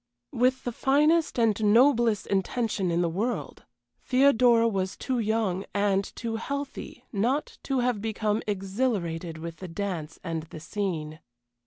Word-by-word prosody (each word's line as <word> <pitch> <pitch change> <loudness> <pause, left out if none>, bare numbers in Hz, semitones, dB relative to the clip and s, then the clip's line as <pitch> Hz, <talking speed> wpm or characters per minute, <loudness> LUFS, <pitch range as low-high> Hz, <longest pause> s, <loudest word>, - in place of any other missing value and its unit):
With 255 +2 +1
the 245 - -2
finest 300 +7 +2
and 220 -2 +2
noblest 230 0 +4
intention 200 0 -1
in 170 +1 +1
the - - +2
world, 210 +9 -3 0.4
Theodora 250 -3 +4
was 190 -3 -2
too 255 -2 -2
young, 215 -4 0
and 200 -1 +2
too 225 -1 -3
healthy, 280 +4 -6
not 250 +9 -1
to 270 -2 0
have 240 -4 0
become 215 0 -1
exhilarated 190 -5 -2
with 165 0 -7
the 185 - -7
dance 165 -3 -4
and 165 -1 -3
the 160 0 -10
scene. 165 -4 -4
215 Hz, 140 wpm, -27 LUFS, 185-245 Hz, 0.4 s, noblest